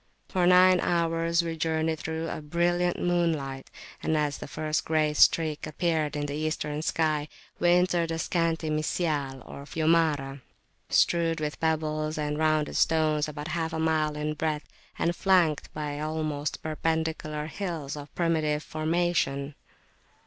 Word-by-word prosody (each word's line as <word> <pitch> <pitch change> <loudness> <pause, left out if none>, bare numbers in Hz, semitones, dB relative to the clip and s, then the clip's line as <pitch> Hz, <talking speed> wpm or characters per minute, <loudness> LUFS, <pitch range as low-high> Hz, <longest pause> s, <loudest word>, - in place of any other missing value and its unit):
For 180 -2 +2
nine 180 0 +6
hours 170 0 +1
we 165 -1 -3
journeyed 160 0 0
through 160 +1 -3
a 155 - -4
brilliant 175 +3 0
moonlight, 160 -7 -1 0.3
and 160 - +1
as 150 -2 -1
the - - -7
first 155 +2 -2
grey 155 -1 +1
streak 155 0 +3
appeared 155 -1 -1
in 145 0 -2
the 145 - -4
Eastern 150 0 -2
sky 155 -2 0 0.3
we 175 - +3
entered 175 -1 +3
a 165 - -2
scanty 165 -1 0
"Misyal,[FN#15]" 150 -4 -1
or 140 - -9
Fiumara, 155 -4 +1 0.5
strewed 165 -1 +2
with 150 -1 -3
pebbles 155 -1 -1
and 150 0 -2
rounded 155 -1 +1
stones, 155 -2 +2
about 150 +2 -6
half 160 -1 -2
a 160 - -2
mile 155 -1 +1
in 150 0 -2
breadth, 155 0 -2 0.3
and 170 +1 0
flanked 175 -6 +2
by 150 -1 -4
almost 155 -1 -3
perpendicular 160 -1 -2
hills 160 -5 -4
of 145 -1 -9
primitive 155 -3 +1
formation. 155 -3 0
155 Hz, 140 wpm, -27 LUFS, 150-165 Hz, 0.5 s, nine